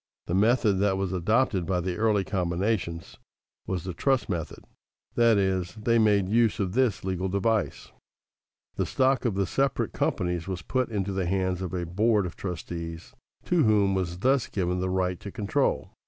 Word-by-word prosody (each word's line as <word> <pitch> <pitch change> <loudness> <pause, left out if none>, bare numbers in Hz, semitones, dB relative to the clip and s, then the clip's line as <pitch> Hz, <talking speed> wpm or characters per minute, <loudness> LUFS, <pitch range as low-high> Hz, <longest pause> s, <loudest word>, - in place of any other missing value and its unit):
The - - -3
method 105 0 +3
that 100 -1 +2
was 95 -1 -2
adopted 95 +1 +1
by 90 -1 +1
the 90 0 -2
early 110 -3 +2
combinations 90 -2 -2 0.5
was 90 -3 -2
the 90 - -5
trust 130 +8 0
method, 85 -5 -4 0.5
that 115 -2 +4
is, 95 -2 0
they 115 +2 +2
made 105 -3 +3
use 115 +2 +2
of 95 -3 -1
this 125 -4 +1
legal 95 0 -2
device: 100 +3 -1 0.9
the - - 0
stock 130 0 +1
of 115 -5 0
the 100 0 +1
separate 135 +8 0
companies 90 -1 -1
was 90 -3 -4
put 130 +4 -1
into 100 -3 -2
the 95 -2 -1
hands 95 -1 0
of 95 - -4
a 90 -1 -2
board 105 +4 +2
of 90 - -6
trustees 85 -2 -6 0.3
to 175 -2 +2
whom 105 -4 +3
was 90 -2 -2
thus 130 +5 +2
given 90 -2 -1
the 95 0 -1
right 90 -1 -1
to 100 - -8
control. 105 -2 -1
95 Hz, 175 wpm, -27 LUFS, 90-110 Hz, 0.9 s, that